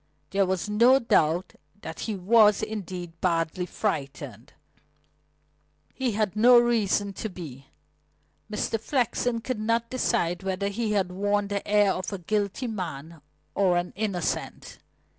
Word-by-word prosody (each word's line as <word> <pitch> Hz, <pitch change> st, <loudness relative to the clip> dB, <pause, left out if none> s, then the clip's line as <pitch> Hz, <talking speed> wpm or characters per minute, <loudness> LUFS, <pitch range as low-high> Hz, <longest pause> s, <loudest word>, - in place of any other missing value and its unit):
There 195 Hz, -1 st, +2 dB
was 185 Hz, 0 st, -1 dB
no 235 Hz, +5 st, +5 dB
doubt 175 Hz, -, +1 dB, 0.3 s
that 160 Hz, -, -7 dB
he 220 Hz, -, -3 dB
was, 210 Hz, +2 st, +4 dB
indeed, 185 Hz, -5 st, -5 dB
badly 170 Hz, 0 st, 0 dB
frightened; 135 Hz, -, -4 dB, 1.4 s
but -, -, -37 dB
he 255 Hz, -4 st, -1 dB
had 210 Hz, -2 st, -1 dB
reason 230 Hz, -4 st, +4 dB
to 220 Hz, -, -5 dB
be. 140 Hz, -8 st, -10 dB, 0.8 s
Mr. 215 Hz, +1 st, -1 dB
Flexen 245 Hz, -1 st, 0 dB
could 240 Hz, 0 st, -3 dB
not 230 Hz, +2 st, 0 dB
decide 210 Hz, -9 st, 0 dB
whether 195 Hz, +1 st, -2 dB
he 215 Hz, +1 st, -2 dB
had 190 Hz, -3 st, 0 dB
worn 205 Hz, +2 st, 0 dB
the 200 Hz, -1 st, -3 dB
air 205 Hz, -1 st, +4 dB
of 185 Hz, -, -4 dB
a 200 Hz, -, -3 dB
guilty 205 Hz, +6 st, -2 dB
man 165 Hz, -, -6 dB, 0.3 s
or 185 Hz, -3 st, +2 dB
an 175 Hz, 0 st, -2 dB
innocent. 195 Hz, -4 st, -3 dB
200 Hz, 135 wpm, -26 LUFS, 180-220 Hz, 1.4 s, no